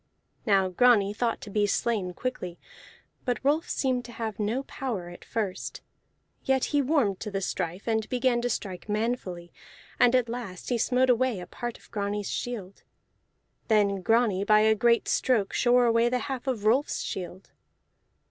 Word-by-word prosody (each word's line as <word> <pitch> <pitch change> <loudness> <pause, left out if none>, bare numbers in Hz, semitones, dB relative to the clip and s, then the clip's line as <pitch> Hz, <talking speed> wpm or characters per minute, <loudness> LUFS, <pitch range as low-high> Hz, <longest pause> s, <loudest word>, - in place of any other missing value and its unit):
Now 195 -2 +4
Grani 205 +1 +4
thought 230 +1 -1
to 205 - -9
be 205 0 +2
slain 200 -5 -1
quickly; 185 -9 -4 0.7
but 245 -2 0
Rolf 295 +4 +1
seemed 255 -2 0
to 240 - -9
have 220 -3 -4
no 220 +6 -1
power 225 -12 -4
at 175 - -12
first; 205 -5 -4 0.6
yet 265 -1 +2
he 290 - +4
warmed 255 - +1
to 215 - -5
the 195 -1 -2
strife, 180 0 -3
and 220 -1 0
began 245 -1 +1
to 245 - -1
strike 195 -3 -4
manfully, 210 -6 -2 0.5
and 245 +1 +5
at 250 -2 +3
last 230 -6 -6
he 245 - +1
smote 255 +2 +3
away 245 -3 +1
a 180 - -7
part 240 +6 -6
of - - -22
Grani's 205 -1 -2
shield. 205 -6 -5 0.9
Then 200 -3 +2
Grani 225 -2 +2
by 215 +1 +5
a 220 0 +5
great 235 +2 +2
stroke 225 -7 +1
shore 245 0 +4
away 230 0 +3
the 250 - +1
half 260 +1 -5
of 230 -6 -2
Rolf's 255 +7 +2
shield. 185 +1 -6
225 Hz, 165 wpm, -27 LUFS, 200-245 Hz, 0.9 s, and